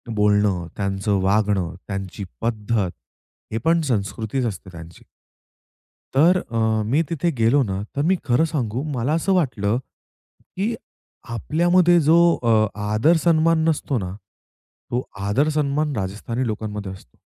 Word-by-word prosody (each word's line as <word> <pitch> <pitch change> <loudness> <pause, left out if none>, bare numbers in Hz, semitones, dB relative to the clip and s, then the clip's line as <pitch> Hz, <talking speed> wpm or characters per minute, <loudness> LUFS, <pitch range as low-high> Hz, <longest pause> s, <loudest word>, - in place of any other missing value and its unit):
बोलणं, 105 -4 +2
त्यांचं 100 0 0
वागणं, 100 -3 +1
त्यांची 95 0 -5 0.2
पद्धत 110 -4 -1 0.6
हे - - 0
पण 165 0 +4
संस्कृतीच 115 0 -2
असते 95 -4 -5
त्यांची. 85 0 -12 1.1
तर 170 +7 +5
अ, 115 - -2 0.3
मी 140 +9 +2
तिथे 170 +1 0
गेलो 115 +6 +4
ना, 95 -2 -3
तर 140 - 0
मी - - +4
खरं 125 +3 +3
सांगू 125 -3 -2
मला 125 +6 0
असं 180 +4 +1
वाटलं, 120 - +1 0.8
की 215 +5 0 0.6
आपल्यामध्ये 175 - +3
जो 160 +3 +5 0.3
अ, 110 -2 +4 0.3
आदर 145 +11 +4
सन्मान 165 -1 +3
नसतो 145 -3 -1
ना, 95 -3 -4 0.8
तो 125 +1 0 0.3
आदर 145 +9 +2
सन्मान 150 -1 0
राजस्थानी 110 +5 -3
लोकांमध्ये 105 -2 -4
असतो. 80 -10 -16
115 Hz, 130 wpm, -22 LUFS, 100-155 Hz, 1.1 s, तर